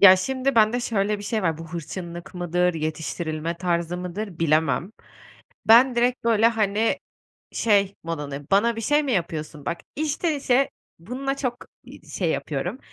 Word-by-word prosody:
Ya, 190 -2 +10
şimdi 265 +7 -1
bende 225 +2 +4
şöyle 210 -3 0
bir - - -8
şey 215 0 -1
var; 165 -3 0
bu 165 0 -8
hırçınlık 170 +1 -6
mıdır, 180 0 +1
yetiştirilme 160 +1 -3
tarzı 170 -1 -1
mıdır, 180 +1 -5
bilemem. 160 +4 +1 0.7
Ben, 245 +3 +7
direkt 245 +1 +1
böyle, 225 -1 +4
hani, 220 -1 +1 0.5
şey 200 -3 +2
modundayım, 145 -4 -5
"Bana 225 +4 +3
bir - - -3
şey 295 +6 +2
mi 275 -3 -1
yapıyorsun?" 160 -5 -3
Bak, 170 - -2 0.2
içten 310 +2 0
içe 275 -1 +2 0.3
bununla 265 +9 -3
çok, 255 -3 -2 0.3
iii, - - -14
şey 175 -4 -1
yapıyorum. 160 - -3
195 Hz, 155 wpm, -24 LUFS, 170-235 Hz, 0.7 s, Ya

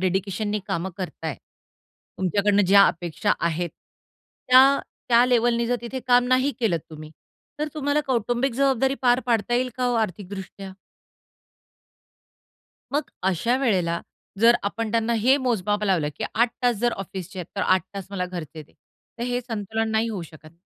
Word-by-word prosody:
डेडिकेशननी 195 +3 -1
काम 170 +3 -2
करताय, 165 -6 -5 0.8
तुमच्याकडनं 200 +2 +2
ज्या 200 +1 +7
अपेक्षा 165 -1 -1
आहेत 170 +1 -1 0.8
त्या, 265 +2 +7 0.3
त्या 240 0 +6
लेव्हलनी 235 -1 +2
जर 245 +1 +1
तिथे 250 +2 -5
काम 245 0 +5
नाही 260 +2 +3
केलंत 180 -9 +1
तुम्ही, 155 0 -10 0.5
तर 300 0 -1
तुम्हाला 285 0 +1
कौटुंबिक 240 +1 0
जबाबदारी 270 0 +2
पार 245 0 +4
पाडता 235 -1 +1
येईल 255 +1 +1
का 255 - -1
हो 245 - +1
आर्थिकदृष्ट्या? 195 -2 -4 2.2
मगं 290 -1 -1 0.2
अशा 230 +7 +1
वेळेला 180 -10 +1 0.4
जर 235 +1 +7
आपण 220 +2 -2
त्यांना 230 +1 +1
हे 260 +5 +4
मोजमाप 210 -5 0
लावलं 175 -7 +1
की - - -3
8 235 +2 +3
तास 245 -2 +2
जर 240 +3 +1
ऑफिसचे 190 -1 -7
आहेत 175 - -5
तर - - -1
8 185 0 +3
तास 195 -2 -6
मला 185 -2 -2
घरचे 160 -4 -7
दे. - - -23 0.5
तर - - -4
हे 245 0 -1
संतुलन 225 -1 -3
नाही 220 +1 +1
होऊ 200 -5 -4
शकत. 155 0 -14
220 Hz, 155 wpm, -24 LUFS, 185-245 Hz, 2.2 s, ज्या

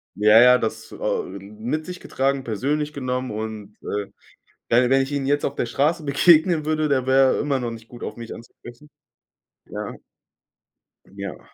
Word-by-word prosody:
Ja, 105 +2 +6
ja, 125 +1 +7
das 110 - -4
au - - -2
ähm, 100 +3 -10
mit 150 +8 -2
sich 180 0 -7
getragen, 135 0 -1
persönlich 145 +7 -2
genommen 130 -2 -3
und, 105 -1 -6
äh, 100 -1 -4 0.6
wenn 120 +1 +3
wenn 135 0 +4
ich 135 +2 -5
ihn 140 -1 -1
jetzt 145 +1 +1
auf 140 - -1
der - - -2
Straße 150 +7 0
begegnen 155 +3 +4
würde, 155 0 0
da 130 -2 +1
wäre 130 0 +4
er - - -2
immer 140 -2 0
noch 120 -1 -3
nicht 115 0 -10
gut 120 - -12
auf - - -5
mich 115 -1 -7
anzusprechen. 120 +4 -14 0.8
Ja. - - -6 1.2
Ja. 100 0 -6
130 Hz, 175 wpm, -23 LUFS, 115-145 Hz, 1.2 s, ja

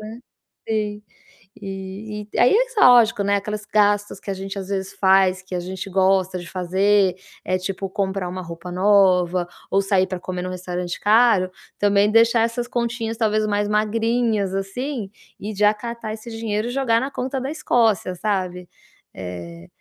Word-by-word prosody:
né. 220 +3 -9 0.5
Sim. 210 -1 -1 0.6
E 200 +2 -7
e - - -1
aí 245 - +5
é - - +2
só, - - -1
lógico, 230 -3 +5
né, 200 0 +2
aquelas 210 +1 -5
gastos 205 0 +1
que 200 - -5
a - - -1
gente 195 +1 -6
às 190 -1 -6
vezes 195 -1 -3
faz, 190 -1 +3
que 185 - -10
a 180 - -1
gente 185 +2 -6
gosta 190 -1 +2
de 175 -1 -9
fazer, 190 +1 +2 0.3
eh, 185 - +1
tipo 195 +1 -4
comprar 190 -1 -2
uma 185 +1 -5
roupa 170 +1 -8
nova 185 -2 +3 0.2
ou 195 - +3
sair 195 -1 +2
pra 185 - -4
comer 180 0 -5
num 185 - -4
restaurante 180 -1 -4
caro, 215 -4 +4 0.3
também 205 0 +3
deixar 230 +1 +4
essas 235 +1 -1
continhas 235 -2 -2
talvez 215 -1 +1
mais 205 0 0
magrinhas, 220 -1 0
assim, 210 +3 -4 0.3
e 210 +2 -5
já 210 +1 +4
catar 230 0 -6
esse 225 +2 -9
dinheiro 225 -1 -2
e - - -4
jogar 245 -3 +2
na 270 +2 -3
conta 265 0 -3
da 270 - -3
Escócia, 225 - +1
sabe. 180 -2 -2 0.5
Eh, 85 -2 -8
200 Hz, 175 wpm, -22 LUFS, 185-225 Hz, 0.6 s, aí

